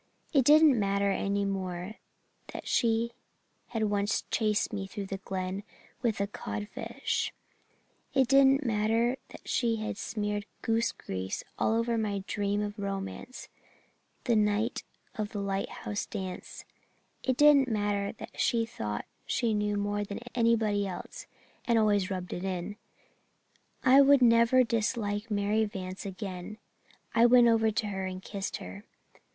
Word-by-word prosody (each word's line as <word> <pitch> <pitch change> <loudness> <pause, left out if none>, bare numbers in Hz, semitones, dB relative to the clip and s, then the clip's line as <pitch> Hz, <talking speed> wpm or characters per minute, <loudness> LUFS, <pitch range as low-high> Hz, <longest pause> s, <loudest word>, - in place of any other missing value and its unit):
It 270 -4 +4
didn't 300 -3 +7
matter 200 0 +1
any 200 +1 0
more 190 0 -4 0.6
that - - -7
she 230 0 +2 0.6
had 225 -2 -2
once 205 +1 0
chased 215 0 +1
me 195 -2 -3
through 200 0 -5
the 195 0 -4
Glen 190 0 -3 0.4
with 225 -5 0
a 200 - +2
codfish; 205 0 -3 0.8
it 265 -2 +4
didn't 275 +1 +5
matter 225 +3 +1
that - - -13
she 235 -2 +1
had 215 -1 -4
smeared 210 -1 -3 0.2
goose 225 +1 +1
grease 95 0 -5 0.2
all 220 - +2
over 230 0 +1
my 200 -3 -2
dream 205 0 -1
of 205 0 -5
romance 195 +5 -5 0.8
the 235 - +2
night 210 +2 +1 0.4
of 210 -1 -3
the 205 - -3
lighthouse 200 +1 -3
dance; 190 -4 -6 0.6
it 260 -1 0
didn't 295 -2 +6
matter 205 -3 0
that - - -10
she 230 -1 +2
thought 105 - -4 0.2
she 230 -2 +1
knew 210 0 0
more 205 0 -1
than 200 0 -6
anybody 220 -4 +2
else 180 -2 -7 0.4
and 235 -1 +3
always 205 -3 +3
rubbed 185 -2 -4
it 175 - -4
in 190 +1 -3 1.1
I 265 +1 +7
would 280 -1 +6
never 235 +2 +6
dislike 225 -2 -1
Mary 210 +1 +1
Vance 190 -1 -6
again. 190 0 -6 0.6
I 230 +1 +6
went 240 0 +7
over 225 -1 +4
to 220 +1 -1
her 190 -1 -3
and 185 0 -5
kissed 200 -2 -4
her. 95 +3 -9
210 Hz, 145 wpm, -29 LUFS, 200-230 Hz, 1.1 s, didn't